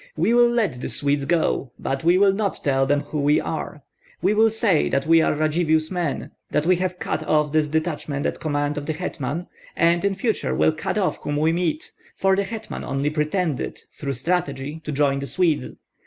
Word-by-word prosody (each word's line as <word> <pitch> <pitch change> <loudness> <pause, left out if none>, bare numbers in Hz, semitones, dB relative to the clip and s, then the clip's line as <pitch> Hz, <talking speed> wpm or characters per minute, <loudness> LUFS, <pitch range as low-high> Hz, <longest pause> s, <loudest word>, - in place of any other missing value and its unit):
We 230 - +2
will 240 0 +6
let 210 - 0
the - - -3
Swedes 140 -1 0
go, 140 -5 0
but 135 +2 -3
we 175 +2 +4
will 195 0 +5
not 200 -1 -2
tell 135 -1 +2
them 145 +1 +2
who 145 +1 -4
we 145 +1 +3
are. - - -5 0.4
We - - +2
will 220 +1 +5
say 215 -7 +2
that 135 +1 0
we 165 +1 +5
are 160 - +2
Radzivill's 155 +1 +1
men, 175 -6 -2 0.2
that 150 - 0
we 180 +1 +4
have 180 0 -2
cut 155 - -3
off 150 -1 +2
this 155 -1 +2
detachment 155 -2 -2
at - - -2
command 145 -1 -1
of 145 - -9
the 155 - 0
hetman, 160 -1 -4 0.3
and 170 +1 +3
in 200 -1 +1
future 195 - -1
will 80 +3 +3
cut - - -3
off - - 0
whom 145 0 -2
we 155 +2 +3
meet, 165 -3 -2 0.2
for 195 0 +2
the 200 - +1
hetman 220 +2 -6
only 140 +2 -1
pretended, 155 -1 -1
through 140 -2 -4
strategy, 145 0 -2
to 150 - -3
join 140 -1 +1
the 140 - -4
Swedes. 170 -3 0
155 Hz, 205 wpm, -23 LUFS, 145-180 Hz, 0.4 s, will